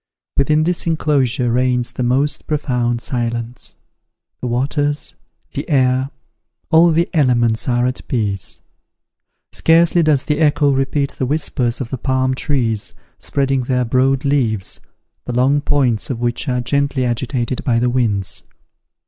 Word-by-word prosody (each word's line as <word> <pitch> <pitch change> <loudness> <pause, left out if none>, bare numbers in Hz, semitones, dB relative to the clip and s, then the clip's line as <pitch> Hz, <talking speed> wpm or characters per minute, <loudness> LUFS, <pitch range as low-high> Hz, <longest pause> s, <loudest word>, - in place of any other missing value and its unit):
Within 150 +3 +2
this 175 +1 -1
inclosure 135 -6 +1
reigns 125 0 +1
the 125 - -5
most 130 +4 0
profound 125 -6 -1
silence. 120 -1 -4 0.6
The 125 - -4
waters, 145 +4 -1 0.4
the - - -5
air, 130 -1 +2 0.6
all 165 +1 +6
the 170 +2 +2
elements 120 -6 +2
are 120 0 +2
at 125 0 -4
peace. 100 -6 -2 0.9
Scarcely 170 +1 +3
does 150 -4 +2
the 150 0 0
echo 145 -2 +3
repeat 135 +1 0
the 130 - -3
whispers 130 -4 -1
of 125 - -5
the 130 - -3
palm 130 0 0
trees 120 -6 -1 0.3
spreading 135 -2 -1
their 125 -1 0
broad 135 +3 +1
leaves, 120 -8 0 0.5
the 125 - -4
long 135 +4 +2
points 130 -7 0
of 125 -4 -3
which 120 +4 -2
are 125 -1 0
gently 140 0 0
agitated 120 +1 -2
by 120 -3 +1
the 120 +1 +1
winds. 110 -6 -1
130 Hz, 140 wpm, -18 LUFS, 120-145 Hz, 0.9 s, all